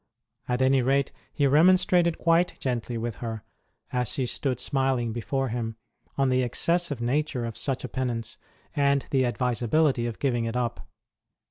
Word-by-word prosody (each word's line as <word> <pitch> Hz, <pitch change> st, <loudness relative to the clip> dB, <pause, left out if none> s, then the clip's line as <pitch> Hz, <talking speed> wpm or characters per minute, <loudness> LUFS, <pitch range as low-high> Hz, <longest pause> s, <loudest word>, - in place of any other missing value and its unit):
At 125 Hz, +1 st, +1 dB
any 130 Hz, 0 st, +4 dB
rate, 135 Hz, +2 st, +1 dB, 0.2 s
he 145 Hz, -, +1 dB
remonstrated 170 Hz, +3 st, +4 dB
quite 170 Hz, +1 st, +2 dB
gently 120 Hz, -2 st, -2 dB
with 115 Hz, -1 st, -4 dB
her, 110 Hz, -3 st, -5 dB, 0.5 s
as 125 Hz, -1 st, 0 dB
she 130 Hz, -, -1 dB
stood 125 Hz, 0 st, -2 dB
smiling 130 Hz, -3 st, 0 dB
before 135 Hz, +3 st, -2 dB
him, 115 Hz, -1 st, -3 dB, 0.4 s
on 135 Hz, -1 st, +2 dB
the 130 Hz, 0 st, +2 dB
excessive 145 Hz, +4 st, 0 dB
nature 130 Hz, 0 st, 0 dB
of 115 Hz, -2 st, -5 dB
such 135 Hz, -3 st, -2 dB
a -, -, -3 dB
penance, 115 Hz, -3 st, -3 dB, 0.4 s
and 140 Hz, -1 st, +2 dB
the 130 Hz, -2 st, +3 dB
advisability 125 Hz, +2 st, +1 dB
of 115 Hz, -, -5 dB
giving 120 Hz, -4 st, 0 dB
it 115 Hz, +1 st, -3 dB
up. 120 Hz, -2 st, -2 dB
130 Hz, 155 wpm, -26 LUFS, 120-140 Hz, 0.5 s, any